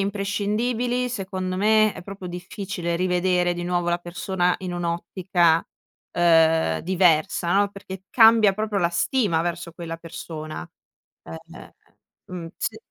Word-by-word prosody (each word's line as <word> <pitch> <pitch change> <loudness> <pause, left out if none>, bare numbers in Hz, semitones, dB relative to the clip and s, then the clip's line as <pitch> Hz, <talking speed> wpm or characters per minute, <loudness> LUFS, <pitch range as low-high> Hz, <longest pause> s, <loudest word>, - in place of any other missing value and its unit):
imprescindibili 210 +5 -1
secondo 185 -4 -4
me 215 +1 +4
è - - -10
proprio 195 0 -8
difficile 180 0 -4
rivedere 180 0 +1
di 175 0 -5
nuovo 175 -1 -1
la 175 - +1
persona 180 +1 -1
in 185 -1 -5
un'ottica 175 0 +1 1.2
diversa, 175 -1 +2
ehm, - - +3
no, 205 0 +3
perché 190 -1 -10
cambia 225 -4 +6
proprio 215 -1 -1
la 170 - +2
stima 170 -1 +1
verso 170 0 -4
quella 165 0 -7
persona, 160 -2 -7 0.6
ehm, 80 0 -11 0.5
mhmm, 175 -2 -7
s - - -3
180 Hz, 125 wpm, -23 LUFS, 175-200 Hz, 1.2 s, cambia